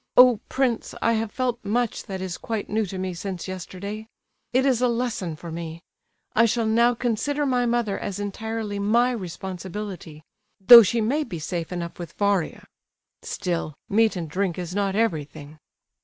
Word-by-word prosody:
Oh, 250 -3 +8
prince, 255 -4 0
I 230 - +2
have 225 -1 -1
felt 250 -2 -2
much 230 +3 -1
that 190 -3 -5
is 185 -1 -4
quite 220 -2 -4
new 215 -1 +1
to 190 - -6
me 185 0 -3
since 185 +1 -5
yesterday! 195 +4 -6 0.4
It 255 +2 +3
is 255 -3 +2
a 250 - +4
lesson 230 -8 -2
for 165 +2 -9
me. 165 0 -6 0.5
I 230 - +6
shall 230 0 +1
now 235 +2 +4
consider 270 +6 -1
my 250 -2 +1
mother 235 -4 0
as 200 -1 -4
entirely 210 0 -4
my 235 +5 +3
responsibility; 185 -4 -6 0.4
though 235 +5 +11
she 230 +2 +1
may 275 +8 +1
be 220 - -6
safe 165 +2 -4
enough 175 -1 -5
with 170 -2 -7
Varia. 200 -4 0 0.6
Still, 170 -5 -3
meat 220 +1 +3
and 170 -3 -3
drink 180 +2 -1
is 180 -1 -5
not 200 -1 0
everything." 155 -7 -2
205 Hz, 170 wpm, -24 LUFS, 180-235 Hz, 0.6 s, though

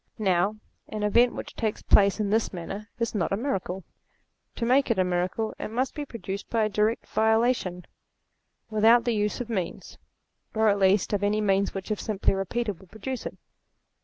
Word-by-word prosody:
Now, 195 -1 +2 0.3
an 215 -1 -4
event 235 +4 +4
which - - -7
takes 220 -3 -2
place 200 +1 +5
in 205 -2 0
this 220 +1 +1
manner, 195 +5 -6
is 230 0 -1
not 205 -5 -1
a 195 - +1
miracle. 195 -7 -3 0.7
To 230 - -2
make 260 +3 +3
it 230 - +2
a 185 - +4
miracle 180 +5 -1
it - - -3
must 250 +4 -1
be 295 -2 -4
pro 230 - -8
duced 195 0 -5
by 225 -2 +1
a 215 - +1
direct 215 +2 0
volition, 220 -5 +1 0.9
without 225 +3 +5
the 240 - +2
use 210 +3 -1
of 245 - -4
means; 190 -7 -4 0.6
or 220 0 +4
at 200 0 +2
least, 195 +1 +3
of 205 - +1
any 205 +1 +1
means 200 -1 +1
which 195 +2 -5
if 210 - -1
simply 205 -3 +1
repeated 195 0 -2
would 190 -2 -17
produce 240 +5 -5
it. - - -9
210 Hz, 190 wpm, -26 LUFS, 195-230 Hz, 0.9 s, place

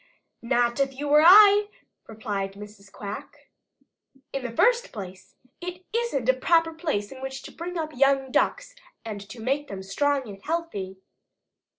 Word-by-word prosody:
"Not 240 +1 +1
if 270 -1 0
you 290 +1 -4
were 300 +1 +6
I," 410 +4 +8 0.4
replied 205 -3 -4
Mrs. 205 -1 -13
Quack. 205 0 -9 0.8
"In 275 - -2
the 250 - -4
first 480 - +2
place 190 -3 -10 0.3
it 360 +1 -7
isn't 460 - -1
a 260 - +6
proper 330 +5 +2
place 305 -12 -3
in 265 -1 -10
which 265 0 -6
to - - -10
bring 350 +2 -6
up 315 -3 -4
young 270 0 +2
Ducks - - 0 0.3
and 205 -2 -7
make 275 +6 -1
them 190 -1 -7
strong 275 +7 0
and 195 -2 -10
healthy. 295 - -4
265 Hz, 155 wpm, -25 LUFS, 210-330 Hz, 0.8 s, I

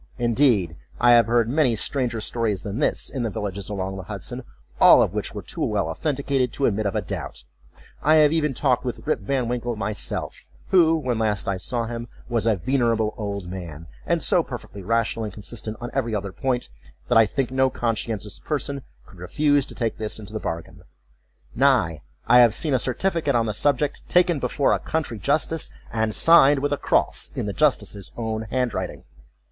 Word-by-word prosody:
Indeed, 115 - +2 0.2
I 120 0 +5
have 120 -2 +6
heard 115 -1 +3
many 130 -2 +2
stranger 120 0 -1
stories 110 -3 -1
than 105 +3 -4
this, 150 - +1
in 135 - -4
the 115 - -1
villages 100 -1 -4
along 95 -1 -3
the - - -5
Hudson; - - -6 0.4
all - - +8
of - - +2
which - - -4
were - - -5
too - - -5
well 80 - 0
authenticated 135 - -1
to 140 - 0
admit 105 -1 +1
of 100 - -3
a - - 0
doubt. - - -6 0.6
I 155 +2 +4
have 150 -1 +5
even 150 -4 0
talked 130 -2 +1
with 125 -2 -5
Rip - - +1
Van 125 +4 -1
Winkle 120 0 -2
myself 105 0 -4 0.2
who, 165 -3 +5
when 125 -7 -2
last 105 -2 0
I 100 -1 0
saw 115 +4 -3
him, 120 0 -5 0.2
was 115 -2 0
a 110 - +4
very 130 +10 -1
venerable 115 -3 +1
old 100 -4 -4
man, 85 -4 -7 0.2
and - - +1
so - - +4
perfectly 100 - -8
rational 115 +2 0
and 105 - -6
consistent 110 +1 -6
on 120 0 -6
every 115 -1 -1
other 100 -1 -3
point, 125 - -2 0.4
that 120 - +4
I 110 - +5
think 130 +3 -2
no 130 0 +3
conscientious 110 -4 -3
person 140 -2 -2 0.2
could 95 - -17
refuse 145 - +1
to - - -10
take 115 -2 -2
this 110 -1 -3
into 105 -1 -10
the 110 - -3
bargain; 85 -4 -6 0.7
nay, 120 - +2 0.2
I 125 +2 +6
have 120 -3 +6
seen 155 -4 0
a 130 - +3
certificate 145 +3 0
on 115 -1 +2
the 110 - -2
subject 145 +4 0
taken 175 -3 +3
before 140 0 +1
a - - +1
country 145 -9 -3
justice 150 - 0 0.2
and 110 -2 0
signed 145 -4 +6
with 145 0 0
a - - 0
cross, - - 0
in - - -2
the 100 - -3
justice's 105 -9 0
own 110 -1 -3
handwriting. 125 0 -2
120 Hz, 195 wpm, -23 LUFS, 105-135 Hz, 0.7 s, all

